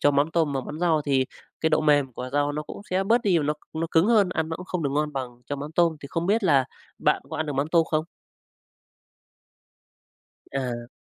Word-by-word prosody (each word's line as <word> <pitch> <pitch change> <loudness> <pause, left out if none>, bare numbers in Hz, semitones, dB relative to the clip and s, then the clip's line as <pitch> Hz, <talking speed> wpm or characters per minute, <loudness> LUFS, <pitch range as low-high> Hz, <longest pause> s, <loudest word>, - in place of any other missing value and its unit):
cho 145 - +5
mắm 145 +3 +2
tôm 160 -4 +2
vào 135 -1 -1
món 155 +6 -7
rau 160 -4 +2
thì 135 -2 +2 0.4
cái 160 - +2
độ 155 - +3
mềm 145 -4 +3
của 125 +2 -6
rau 145 0 +1
nó 150 +1 -3
cũng 150 - -9
sẽ 190 +1 +1
bớt 235 +4 +3
đi 185 -5 +3
và 150 - -1
nó 150 +1 +1 0.2
nó 165 +1 -1
cứng 165 +4 +4
hơn, 215 -5 +4
ăn 160 -2 -1
nó 160 - -3
cũng 180 - -9
không 180 -2 -2
được 140 - 0
ngon 150 0 0
bằng 125 -2 -6
cho 145 - -3
mắm 145 +3 -6
tôm, 165 -1 +3
thì 140 - -9
không 165 +4 -2
biết 210 +1 +2
là 140 -6 +4 0.3
bạn - - +2
có - - -4
ăn 155 - -1
được 145 - -2
mắm 140 +2 -1
tôm 165 0 +4
không? 155 0 +1 2.5
À. 120 -3 -3
150 Hz, 240 wpm, -25 LUFS, 140-165 Hz, 2.5 s, cho